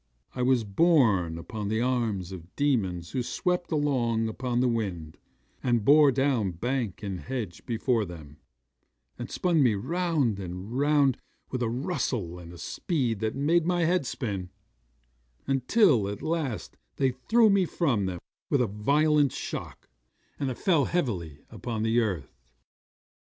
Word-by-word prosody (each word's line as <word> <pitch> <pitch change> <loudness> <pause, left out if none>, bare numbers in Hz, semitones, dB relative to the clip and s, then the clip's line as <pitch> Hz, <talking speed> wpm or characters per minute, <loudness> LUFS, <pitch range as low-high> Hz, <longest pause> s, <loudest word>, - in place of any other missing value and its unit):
I 125 - -3
was 125 -2 +3
borne 105 - +3
upon 100 +5 -5
the 110 +2 0
arms 115 -7 -1
of 90 -1 -10
demons 95 -12 0
who 130 - -1
swept 180 +8 -1
along 125 -7 +1
upon 125 +2 -2
the 125 - +3
wind, 95 -10 -3 0.4
and 120 -4 +1
bore 145 0 +7
down 130 -8 +1
bank 115 +1 -3
and 95 -3 -4
hedge 115 -8 -5
before 115 0 +1
them, 80 -6 -10 0.8
and - - -5
spun 175 -4 +1
me 120 -6 +4
round 155 - 0
and 95 +4 -6
round 145 -2 +3 0.3
with 130 - -2
a 115 - +1
rustle 120 - -2
and 85 -1 -10
a 85 - -11
speed 120 - -2
that 110 0 -2
made 160 +5 +2
my 175 -2 +2
head 175 -5 +1
swim, 100 -7 -4 1.0
until 135 - +3
at 100 0 -5
last 155 -8 -3 0.2
they 135 -2 +2
threw 220 - +3
me 195 -2 +3
from 125 - 0
them 90 -1 -3 0.3
with 140 - +3
a - - +3
violent 140 +7 +2
shock, - - -6 0.5
and 140 -2 -1
I 125 - -3
fell 160 -4 +2
heavily 90 - -2
upon 115 -3 -4
the 115 +1 +3
earth. 95 - -2
120 Hz, 150 wpm, -27 LUFS, 100-145 Hz, 1.0 s, bore